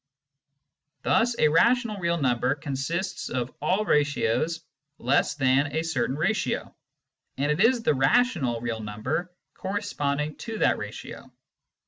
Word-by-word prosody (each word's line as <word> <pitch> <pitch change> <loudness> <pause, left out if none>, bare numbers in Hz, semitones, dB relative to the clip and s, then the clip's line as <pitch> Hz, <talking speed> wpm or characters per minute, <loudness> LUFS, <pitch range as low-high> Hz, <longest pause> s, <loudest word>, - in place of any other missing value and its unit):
Thus 240 +1 +2
a - - +4
rational 230 +6 +3
real 170 -2 0
number 125 -2 +1
consists 150 +6 -3
of 125 -1 -3
all 190 +8 +1
ratios 150 - +1 0.4
less 135 +4 +1
than 135 +1 +2
a 160 - +1
certain 135 -5 -1
ratio, 175 +9 -1 0.6
and 145 +2 +1
it 150 - 0
is 235 0 +3
the - - +3
rational 135 - +2
real 115 -2 -3
number 110 +12 -3 0.2
corresponding 155 -7 -2
to 225 -1 -6
that - - +2
ratio. - - -8
150 Hz, 125 wpm, -26 LUFS, 130-190 Hz, 0.6 s, a